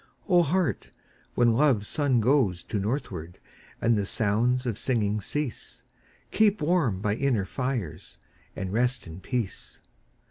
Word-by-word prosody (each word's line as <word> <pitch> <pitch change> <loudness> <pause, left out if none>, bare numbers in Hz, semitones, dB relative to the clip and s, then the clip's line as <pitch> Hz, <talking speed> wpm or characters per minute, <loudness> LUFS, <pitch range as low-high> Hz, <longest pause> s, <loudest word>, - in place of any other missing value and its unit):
O 180 -4 +5
Heart, 170 +2 0 0.5
when 120 -1 +4
Love's 120 -5 +3
sun 140 -6 +1
goes 110 - +2
To 105 - -3
northward, 95 - -4 0.4
and 115 0 +3
the 100 -2 -1
sounds 120 +5 +1
of 115 -3 -2
singing 105 -4 0
cease, 145 +4 -4 0.5
Keep 215 -1 +3
warm 150 - +1
by 105 0 +1
inner 120 -4 0
fires, 125 - -4 0.4
and 95 0 -4
rest 125 +1 +1
in 80 +1 -9
peace. 120 -1 -4
120 Hz, 135 wpm, -27 LUFS, 100-140 Hz, 0.5 s, O